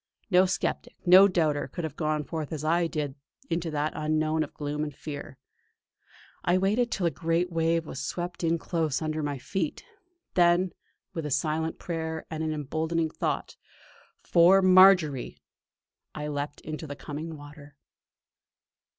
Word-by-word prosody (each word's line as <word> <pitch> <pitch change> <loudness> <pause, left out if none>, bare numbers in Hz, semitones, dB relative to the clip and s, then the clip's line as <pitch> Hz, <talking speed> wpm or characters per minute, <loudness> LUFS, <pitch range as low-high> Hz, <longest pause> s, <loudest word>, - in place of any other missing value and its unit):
No 185 +1 +6
sceptic, 180 - -2
no 185 +2 +9
doubter, 160 -6 +1
could 175 - -6
have 155 -3 -4
gone 155 -1 -1
forth 155 +1 -5
as 155 -2 -4
I 170 +2 +2
did 150 -3 -3 0.4
into 165 0 -1
that 150 0 -1
unknown 155 +1 +1
of - - -8
gloom 150 0 -3
and 150 - -3
fear. 145 -3 -7 1.1
I 175 +1 +3
waited 210 +6 +1
till 190 - -1
a 170 - +2
great 165 +5 0
wave 165 0 +1
was 140 -2 -6
swept 175 +5 -4
in 165 0 +2
close 160 -4 -1
under 155 0 -2
my 145 -1 -2
bare 135 - -7
feet. 180 -1 -3 0.5
Then, 175 +1 +3 0.4
with 160 -3 -3
a - - -4
silent 155 +3 -1
prayer, 160 -2 -4
and 160 0 -3
an 160 - -1
emboldening 160 +2 -1
thought: - - -3 0.7
'For 180 +3 +5
Marjory!' 185 -7 +5 0.8
I 150 0 -4
leaped 145 0 -4
into 155 0 -6
the 145 - -6
coming 155 +3 -6
water. 145 0 -13
160 Hz, 155 wpm, -27 LUFS, 150-175 Hz, 1.1 s, no